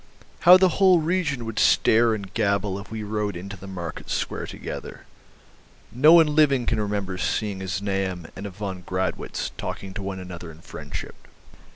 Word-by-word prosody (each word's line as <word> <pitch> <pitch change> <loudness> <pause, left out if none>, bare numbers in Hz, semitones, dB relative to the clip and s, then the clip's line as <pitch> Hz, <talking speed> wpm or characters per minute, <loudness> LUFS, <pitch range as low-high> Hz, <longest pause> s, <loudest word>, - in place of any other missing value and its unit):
"How 180 - +12
the 185 0 +2
whole 185 -3 +7
region 155 -7 -1
would 115 -1 -3
stare 115 0 +4
and 100 -3 -8
gabble 100 -2 0
if 100 - -11
we 110 -1 -5
rode 105 -2 -2
into 100 +3 -7
the 100 0 -11
market 85 -4 -7
square - - -2
together. - - -8 0.9
No 150 +7 +6
one 160 -3 +6
living 140 -5 +3
can 115 -2 0
remember 100 -3 -2
seeing 95 +3 -1
a 95 - -5
Znaeym 95 -2 -2
and 100 +1 -6
a - - -6
von 95 -1 -6
Gradwitz 95 0 -3
talking 95 -1 -5
to 100 - -5
one 95 -1 -4
another 90 -2 -8
in 80 0 -13
friendship. 75 -4 -8
100 Hz, 175 wpm, -24 LUFS, 95-115 Hz, 0.9 s, How